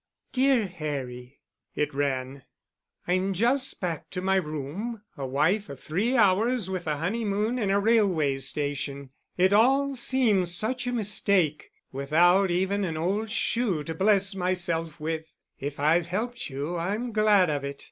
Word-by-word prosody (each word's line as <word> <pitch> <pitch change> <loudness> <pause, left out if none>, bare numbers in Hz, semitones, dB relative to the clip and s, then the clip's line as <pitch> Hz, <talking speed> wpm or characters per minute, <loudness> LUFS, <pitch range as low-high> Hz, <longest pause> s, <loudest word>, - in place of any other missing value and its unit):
"Dear 260 -3 +3
Harry" 140 -7 -6 0.3
(it 150 0 -1
ran): 135 -1 -2 0.7
"I'm 185 +2 +1
just 250 +7 0
back 170 -4 -4
to 180 - -5
my 190 +1 +2
room, 180 - -4
a 135 -4 -4
wife 160 +11 +1
of 140 -2 -8
three 215 +11 0
hours 210 +1 +2
with 180 -3 -4
a 150 -1 0
honeymoon 210 - -1
in 205 -4 0
a 200 +1 +3
railway 195 -11 +2
station! 140 -1 -4 0.3
It 185 +2 +4
all 270 +6 +4
seems 220 -9 +1
such 245 +5 -2
a - - 0
mistake—without 180 - +1
even 190 +3 0
an 165 -4 -2
old 200 +7 -1
shoe 215 -7 0
to 160 - -5
bless 195 +3 +2
myself 175 -4 -1
with. 160 +1 -4 0.3
If 140 +1 -5
I've 160 +4 +3
helped 235 +6 -3
you 145 +6 -4
I'm 210 +8 -2
glad 210 -5 +4
of 145 -1 -2
it. 140 0 -5
185 Hz, 145 wpm, -27 LUFS, 150-215 Hz, 0.7 s, It